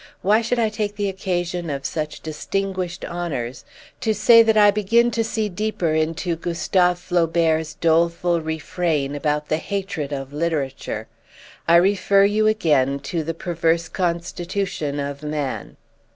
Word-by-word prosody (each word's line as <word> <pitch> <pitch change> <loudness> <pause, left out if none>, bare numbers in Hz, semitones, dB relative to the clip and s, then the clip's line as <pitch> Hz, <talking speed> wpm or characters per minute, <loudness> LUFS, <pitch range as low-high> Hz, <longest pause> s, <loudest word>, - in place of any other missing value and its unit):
Why 210 +4 +4
should 240 +2 -1
I 225 -2 +2
take 210 -1 -3
the 205 -1 -1
occasion 175 -3 -2
of 140 -1 -4
such 155 -1 -3
distinguished 185 +3 -3
honours 145 -9 -4 0.4
to 220 -1 0
say 230 +3 +7
that 220 -1 +3
I 205 -1 +7
begin 230 +4 +2
to 230 -1 0
see 220 -1 -1
deeper 185 -4 -1
into 165 +2 0
Gustave 180 +2 +1
Flaubert's 165 -3 +1
doleful 170 +1 +2
refrain 160 -2 -2
about 150 0 -1
the 155 - +2
hatred 185 -5 -4
of 135 -1 -5
literature? 145 -8 -2 0.6
I 170 - +6
refer 195 +2 +4
you 215 +1 +2
again 150 -11 +2
to 160 +4 -3
the 165 +1 -4
perverse 170 -1 0
constitution 175 -2 -2
of 140 0 -4
man. 150 -3 -4
170 Hz, 140 wpm, -22 LUFS, 155-195 Hz, 0.6 s, say